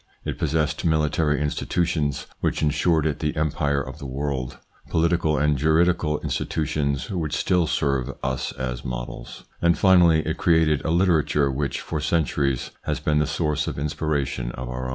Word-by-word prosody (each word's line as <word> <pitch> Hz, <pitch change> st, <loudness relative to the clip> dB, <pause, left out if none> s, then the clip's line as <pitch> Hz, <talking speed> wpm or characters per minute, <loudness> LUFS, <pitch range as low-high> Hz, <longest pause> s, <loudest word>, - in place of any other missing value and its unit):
It -, -, -4 dB
possessed 75 Hz, +1 st, 0 dB
military 75 Hz, -2 st, +1 dB
institutions 75 Hz, -1 st, -1 dB
which -, -, -1 dB
insured 75 Hz, +1 st, +2 dB
it 75 Hz, -2 st, -1 dB
the 75 Hz, -1 st, -1 dB
empire 75 Hz, -2 st, 0 dB
of -, -, -9 dB
the 70 Hz, -, -6 dB
world; 65 Hz, -1 st, -3 dB, 0.3 s
political 80 Hz, -2 st, +2 dB
and 75 Hz, 0 st, +2 dB
juridical 80 Hz, 0 st, +2 dB
institu 80 Hz, -, -2 dB
tions 70 Hz, +3 st, -1 dB
which 80 Hz, -6 st, -2 dB
still 90 Hz, -3 st, +2 dB
serve 70 Hz, -4 st, 0 dB
us 65 Hz, -1 st, -2 dB
as 65 Hz, -1 st, -4 dB
models; -, -, -6 dB, 0.2 s
and 85 Hz, 0 st, +3 dB
finally, 85 Hz, -4 st, +5 dB
it 80 Hz, -, -2 dB
created 80 Hz, -4 st, +3 dB
a -, -, -2 dB
literature 80 Hz, -5 st, +2 dB
which 70 Hz, +1 st, -2 dB
for 80 Hz, -, -3 dB
centuries 75 Hz, -4 st, 0 dB
has -, -, -1 dB
been 75 Hz, 0 st, +1 dB
the 75 Hz, -, +1 dB
source 75 Hz, -3 st, -1 dB
of -, -, -4 dB
inspiration 70 Hz, -4 st, -2 dB
of 60 Hz, 0 st, -6 dB
our 65 Hz, 0 st, -4 dB
own. -, -, -3 dB
75 Hz, 165 wpm, -24 LUFS, 70-80 Hz, 0.3 s, finally